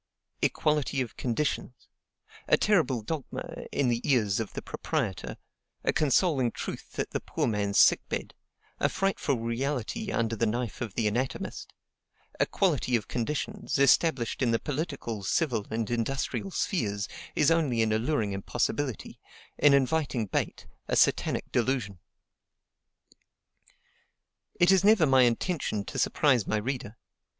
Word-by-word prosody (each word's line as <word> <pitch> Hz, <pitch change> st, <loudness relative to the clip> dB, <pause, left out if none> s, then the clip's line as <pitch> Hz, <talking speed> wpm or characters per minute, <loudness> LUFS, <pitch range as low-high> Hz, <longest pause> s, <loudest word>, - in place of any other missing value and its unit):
Equality 150 Hz, -2 st, +1 dB
of 120 Hz, -, -5 dB
conditions, 125 Hz, 0 st, -2 dB, 0.6 s
a -, -, +5 dB
terrible 160 Hz, -, +2 dB
dogma 145 Hz, +4 st, -5 dB
in 140 Hz, -, +1 dB
the 120 Hz, -1 st, +1 dB
ears 110 Hz, -8 st, +2 dB
of 110 Hz, -, -4 dB
the -, -, -5 dB
proprietor, 60 Hz, -1 st, -3 dB, 0.5 s
a -, -, +1 dB
consoling 150 Hz, -3 st, +2 dB
truth -, -, -7 dB
at -, -, -2 dB
the -, -, -1 dB
poor -, -, -2 dB
man's 100 Hz, -2 st, 0 dB
sick -, -, +7 dB
bed, -, -, -4 dB, 0.5 s
a -, -, +2 dB
frightful 195 Hz, -8 st, 0 dB
reality 130 Hz, -, -2 dB
under 115 Hz, -, 0 dB
the 115 Hz, +1 st, +1 dB
knife 120 Hz, 0 st, -3 dB
of 110 Hz, -5 st, -4 dB
the 110 Hz, -, +1 dB
anatomist, 125 Hz, +5 st, -3 dB, 0.7 s
equality 125 Hz, -, +1 dB
of 110 Hz, -5 st, -1 dB
conditions, 150 Hz, -, -2 dB
established 135 Hz, -2 st, +3 dB
in 125 Hz, -, +3 dB
the 115 Hz, -, +3 dB
political, 140 Hz, -, -4 dB
civil, 115 Hz, -, 0 dB
and 110 Hz, 0 st, -2 dB
industrial 130 Hz, -, -2 dB
spheres, 105 Hz, -, -1 dB, 0.3 s
is 150 Hz, +2 st, +4 dB
only 140 Hz, -9 st, +2 dB
an 110 Hz, -, 0 dB
alluring 110 Hz, -2 st, 0 dB
impossibility, 120 Hz, +5 st, -2 dB, 0.4 s
an 145 Hz, -1 st, +6 dB
inviting 135 Hz, -4 st, +1 dB
bait, 95 Hz, -, -3 dB, 0.2 s
a -, -, 0 dB
satanic -, -, +2 dB
delusion. 115 Hz, -6 st, 0 dB, 2.6 s
It 175 Hz, +1 st, +6 dB
is 190 Hz, -1 st, +4 dB
never 205 Hz, -5 st, +6 dB
my 135 Hz, -2 st, +5 dB
intention 120 Hz, -, 0 dB
to -, -, -5 dB
surprise 130 Hz, -8 st, +2 dB
my 110 Hz, -, +1 dB
reader. 115 Hz, -1 st, -4 dB
125 Hz, 135 wpm, -28 LUFS, 115-150 Hz, 2.6 s, sick